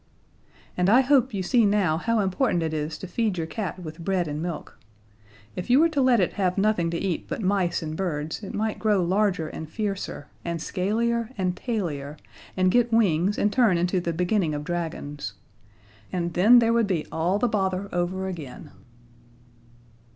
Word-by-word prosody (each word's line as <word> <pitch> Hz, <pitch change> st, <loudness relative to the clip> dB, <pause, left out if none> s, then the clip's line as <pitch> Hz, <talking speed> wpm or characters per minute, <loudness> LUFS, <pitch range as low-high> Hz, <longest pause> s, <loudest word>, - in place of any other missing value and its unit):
And 180 Hz, +1 st, +2 dB
I 245 Hz, +5 st, +7 dB
hope 265 Hz, -1 st, +3 dB
you 195 Hz, -3 st, -2 dB
see 235 Hz, +5 st, +3 dB
now 200 Hz, -6 st, +2 dB
how 230 Hz, +3 st, +1 dB
important 190 Hz, -2 st, +1 dB
it 160 Hz, -1 st, -2 dB
is 155 Hz, 0 st, -3 dB
to 190 Hz, -, -8 dB
feed 210 Hz, +1 st, -1 dB
your 165 Hz, -, -1 dB
cat 185 Hz, 0 st, -4 dB
with 165 Hz, -1 st, -8 dB
bread 185 Hz, -2 st, 0 dB
and 150 Hz, +1 st, -4 dB
milk. 170 Hz, -2 st, -6 dB, 0.8 s
If 180 Hz, -, -5 dB
you 255 Hz, +3 st, +6 dB
were 330 Hz, +2 st, +5 dB
to 295 Hz, -4 st, 0 dB
let 255 Hz, -3 st, +4 dB
it 180 Hz, -, +1 dB
have 180 Hz, 0 st, +1 dB
nothing 195 Hz, -4 st, +2 dB
to 170 Hz, -, -2 dB
eat 175 Hz, -1 st, -2 dB
but 220 Hz, -, -4 dB
mice 185 Hz, -4 st, +1 dB
and 155 Hz, 0 st, -4 dB
birds 160 Hz, -3 st, -3 dB
it 200 Hz, -, -7 dB
might 220 Hz, 0 st, -2 dB
grow 210 Hz, -4 st, +2 dB
larger 185 Hz, -2 st, +1 dB
and 155 Hz, 0 st, -7 dB
fiercer, 195 Hz, -6 st, -4 dB, 0.2 s
and 170 Hz, -1 st, -3 dB
scalier 225 Hz, +6 st, -1 dB
and 180 Hz, -2 st, 0 dB
tailier, 155 Hz, -, -3 dB, 0.4 s
and 185 Hz, 0 st, +3 dB
get 240 Hz, +2 st, +3 dB
wings 200 Hz, -3 st, +2 dB
and 205 Hz, 0 st, +1 dB
turn 225 Hz, -9 st, +4 dB
into 180 Hz, +2 st, +1 dB
the 170 Hz, -1 st, -2 dB
beginning 175 Hz, -1 st, 0 dB
of 145 Hz, -, -4 dB
dragons. 155 Hz, -, -4 dB, 0.8 s
And 175 Hz, -2 st, -2 dB
then 215 Hz, +9 st, +6 dB
there 230 Hz, -1 st, +4 dB
would 230 Hz, -2 st, +2 dB
be 175 Hz, -6 st, -1 dB
all 170 Hz, +5 st, +1 dB
the 245 Hz, -, +1 dB
bother 195 Hz, -3 st, -1 dB
over 180 Hz, +2 st, -1 dB
again. 155 Hz, -9 st, -8 dB
185 Hz, 185 wpm, -25 LUFS, 170-215 Hz, 0.8 s, I